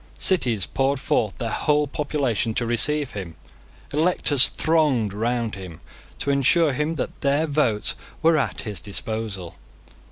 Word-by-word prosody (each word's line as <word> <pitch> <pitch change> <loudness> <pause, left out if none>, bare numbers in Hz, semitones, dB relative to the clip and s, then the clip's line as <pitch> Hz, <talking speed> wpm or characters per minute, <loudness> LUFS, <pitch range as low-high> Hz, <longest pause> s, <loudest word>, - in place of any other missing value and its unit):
Cities 120 - +2
poured 135 +1 0
forth 110 -6 0
their 115 -3 -3
whole 150 +3 +2
population 135 -6 -1
to 120 - 0
receive 140 +5 +1
him. 90 -6 -7 0.6
Electors 150 -3 +3
thronged 145 -11 +1
round 115 +1 -1
him, 95 -4 -8 0.4
to 140 - -1
assure 140 +3 +3
him 150 +4 -1
that - - -5
their 140 +3 +2
votes 140 -9 0 0.3
were 165 0 +5
at 145 - -1
his 105 -6 -4
disposal. 100 -2 -4
130 Hz, 135 wpm, -23 LUFS, 110-150 Hz, 0.6 s, were